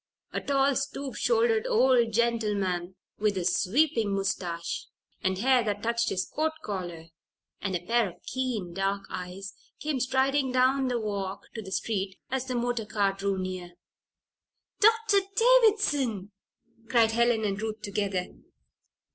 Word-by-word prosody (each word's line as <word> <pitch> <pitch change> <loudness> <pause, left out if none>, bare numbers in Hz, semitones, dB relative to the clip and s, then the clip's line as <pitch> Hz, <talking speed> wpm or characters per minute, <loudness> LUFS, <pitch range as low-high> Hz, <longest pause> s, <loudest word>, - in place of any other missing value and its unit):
A - - -1
tall, 275 -1 +2
stoop 275 0 -3
shouldered 465 -1 +2
old 255 - +4
gentleman, 205 -6 0 0.2
with 210 -2 +1
a 180 - -1
sweeping 225 - +2
mustache 175 -3 -2 0.3
and 190 0 0
hair 250 +3 +3
that 205 -1 -2
touched 235 0 +1
his 185 0 -1
coat 315 +1 -1
collar, 175 -5 -5 0.6
and 195 -2 -2
a 175 0 -4
pair 230 -2 +2
of 175 - -17
keen, 240 -9 -3
dark 195 +2 -1
eyes, 185 +2 -6 0.3
came 295 -3 -1
striding 265 +1 +1
down 260 +1 +3
the 245 -1 0
walk 200 -3 -3
to 220 - -5
the 190 -2 -9
street 195 -2 -2
as 265 0 -1
the 255 - -2
motor 240 -2 -1
car 200 -2 +1
drew 195 0 -1
near. 185 -1 -5 1.1
"Doctor 445 -1 +5 0.2
Davison!" 415 - +3 0.6
cried 230 -3 +4
Helen 235 -1 +2
and 200 0 -2
Ruth 220 -1 -4
together. 200 -3 -1
225 Hz, 140 wpm, -28 LUFS, 195-265 Hz, 1.1 s, Doctor